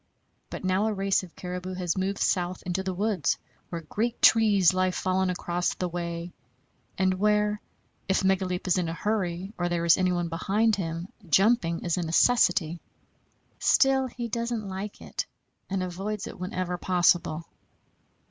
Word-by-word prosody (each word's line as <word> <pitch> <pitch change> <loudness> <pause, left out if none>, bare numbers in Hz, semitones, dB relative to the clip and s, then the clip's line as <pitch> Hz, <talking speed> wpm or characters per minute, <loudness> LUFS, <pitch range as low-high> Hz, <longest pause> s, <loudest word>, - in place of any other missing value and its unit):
But - - -7
now 190 +3 +2
a 220 - 0
race 195 0 +1
of 180 -3 -12
caribou 180 +1 -5
has 180 -2 -1
moved 195 +1 -1
south 180 -1 0
into 180 +1 -2
the 190 0 -2
woods, 200 -6 0 0.3
where 170 -1 -4
great 225 +9 -2
trees 205 -5 +5
lie 185 0 +2
fallen 185 +1 0
across 175 -1 -1
the 180 - -2
way, 170 0 -5 0.6
and 190 -1 +2
where, 210 0 +2 0.5
if 190 - +2
Megaleep 190 -1 0
is 185 0 +2
in 170 -2 -1
a - - -3
hurry 190 -1 -2
or 175 0 0
there 170 -1 -1
is 170 +2 +5
anybody 180 -2 +1
behind 205 +6 +1
him, 170 -2 -4 0.2
jumping 190 -2 +3
is 170 -1 0
a - - 0
necessity. 170 -1 +3 0.8
Still 270 -1 +4
he 240 -1 -5
doesn't 235 -2 -3
like 195 +2 -6
it, - - -4 0.4
and 190 -1 -1
avoids 195 +3 -4
it - - -9
whenever 180 -1 -3
possible. 175 -3 +2
185 Hz, 155 wpm, -27 LUFS, 175-205 Hz, 0.8 s, trees